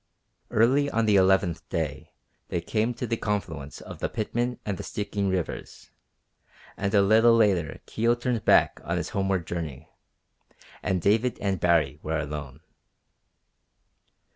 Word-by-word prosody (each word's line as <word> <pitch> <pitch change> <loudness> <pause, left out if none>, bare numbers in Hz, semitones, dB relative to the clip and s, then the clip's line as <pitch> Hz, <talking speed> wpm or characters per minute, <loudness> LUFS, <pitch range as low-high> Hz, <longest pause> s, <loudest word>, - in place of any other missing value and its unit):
Early 135 +6 +3
on 115 -4 +1
the 105 -2 +4
eleventh 95 -3 +2
day 75 -4 -3 0.4
they 85 - -2
came 110 +7 0
to 125 - -3
the 115 -1 -1
confluence 85 -10 -3
of - - -10
the - - -1
Pitman 120 +3 -2
and 100 -3 -2
the - - -4
Stikine 100 -1 -2
rivers, 90 -3 -4 0.8
and 100 0 -2
a 100 - +6
little 110 +3 +5
later 95 -9 +2
Kio 115 +2 +1
turned 120 -2 -2
back - - +4
on - - -2
his - - -3
homeward 95 -3 -1
journey, 80 -4 -5 0.9
and 90 -3 -1
David 110 +4 +2
and 95 -2 -1
Baree 80 -5 +2
were 80 +1 -2
alone. 75 -2 -5
100 Hz, 140 wpm, -26 LUFS, 85-110 Hz, 0.9 s, a